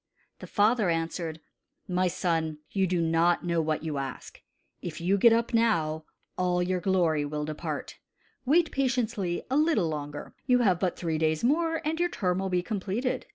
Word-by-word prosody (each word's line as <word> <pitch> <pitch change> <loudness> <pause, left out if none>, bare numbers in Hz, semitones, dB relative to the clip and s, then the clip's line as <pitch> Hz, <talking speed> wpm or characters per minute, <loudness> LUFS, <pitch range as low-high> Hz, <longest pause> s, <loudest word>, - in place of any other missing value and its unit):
The - - -9
father 215 -1 +2
answered: 165 -1 -2 0.5
"My 185 0 +1
son, 165 -3 -1
you 195 -1 +1
know 180 -1 0
not 165 +2 +2 0.2
what 155 0 -1
you 155 -3 -2
ask. 135 -1 -7 0.4
If 170 -3 -6
you 180 +4 +2
get 230 +4 +6
up 230 +2 +1
now, 160 -9 +1 0.3
all 180 -1 +1
your 180 0 0
glory 175 -6 +2
will 150 +1 -3
depart. 155 0 -5 0.4
Wait 320 +5 +3
patiently 235 -9 -1
a 270 - +3
little 300 - +2
longer. 145 -1 -6
You 250 -1 +4
have 185 -5 +3
but 180 -2 -1
three 160 -3 -2
days 155 -1 +1
more, 325 +5 +1
and 320 +2 -1
your 350 0 +2
term 185 - -1
will 190 0 -2
be 180 -1 0
completed. 210 +5 -2
180 Hz, 170 wpm, -28 LUFS, 160-230 Hz, 0.5 s, get